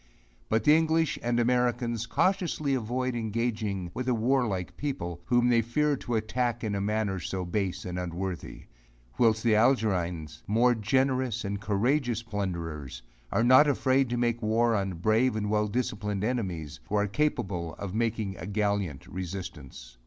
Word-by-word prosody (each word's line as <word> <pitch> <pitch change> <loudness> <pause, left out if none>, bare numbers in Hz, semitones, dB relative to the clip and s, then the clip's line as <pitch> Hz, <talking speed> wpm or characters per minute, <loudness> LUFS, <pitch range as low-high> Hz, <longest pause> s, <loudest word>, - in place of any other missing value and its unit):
But 110 +1 +2
the 150 +1 +6
English 160 -1 +2
and 120 0 0
Americans 120 -1 +1
cautiously 170 - +1
avoid 125 +1 -1
engaging 110 -5 -2
with 130 - -4
a 125 - +2
warlike 115 -6 0
people, 90 - -4
whom 120 +2 +3
they 120 -1 +4
fear 145 +6 +1
to 120 - -3
attack 120 +2 -1
in 105 -2 -1
a 100 - -1
manner 105 -2 -1
so 90 +2 -3
base 95 +1 -2
and 90 0 -4
unworthy; 90 +1 -5 0.6
whilst 110 -2 +3
the 115 -2 +4
Algerines, 90 - +1
more 120 +4 +4
generous 130 +1 0
and 100 0 -3
courageous 120 +3 +1
plunderers, 85 - -4 0.3
are 115 - +2
not 130 +5 +7
afraid 135 -2 +2
to 120 - -1
make 120 -1 0
war 115 +1 +2
on 95 -2 -1
brave 110 +8 +2
and 105 -1 -1
well 105 0 +2
disciplined 105 -3 -2
enemies, 90 - -3
who 105 - -1
are 105 0 +3
capable 100 - -1
of 100 -2 -6
making 110 -3 -1
a - - -7
gallant 100 -8 -1
resistance. 85 -10 -7
110 Hz, 155 wpm, -28 LUFS, 95-120 Hz, 0.6 s, not